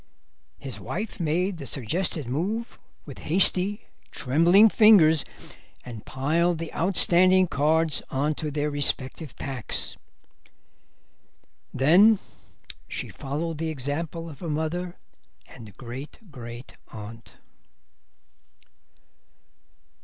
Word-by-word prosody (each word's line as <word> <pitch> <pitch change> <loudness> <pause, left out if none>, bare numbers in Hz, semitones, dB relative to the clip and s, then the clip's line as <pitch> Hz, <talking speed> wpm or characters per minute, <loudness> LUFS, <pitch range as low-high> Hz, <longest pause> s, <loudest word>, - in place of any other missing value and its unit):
His 135 -3 -7
wife 210 +3 -5
made 175 +3 0
the 140 -4 -8
suggested 155 - -2
move 200 - -3 0.3
with 140 - -10
hasty, 190 +4 +1 0.3
trembling 170 - +4
fingers, 195 - +6 0.6
and 115 -4 -9
piled 160 +6 +1
the 165 0 -6
outstanding 185 +1 +4
cards 160 0 +1
on 145 +3 0
to 155 0 -4
their 150 0 -2
respective 145 0 0
packs. 135 -4 -4 1.7
Then 185 - +5 0.7
she - - -5
followed 150 +3 -4
the 165 0 -2
example 155 +4 -4
of 150 -5 -10
her 170 - -5
mother 165 +4 -3 0.5
and 110 -5 -13
great 130 +4 -8
grand 120 -1 -9
aunt. 110 +2 -11
155 Hz, 95 wpm, -25 LUFS, 135-175 Hz, 1.7 s, fingers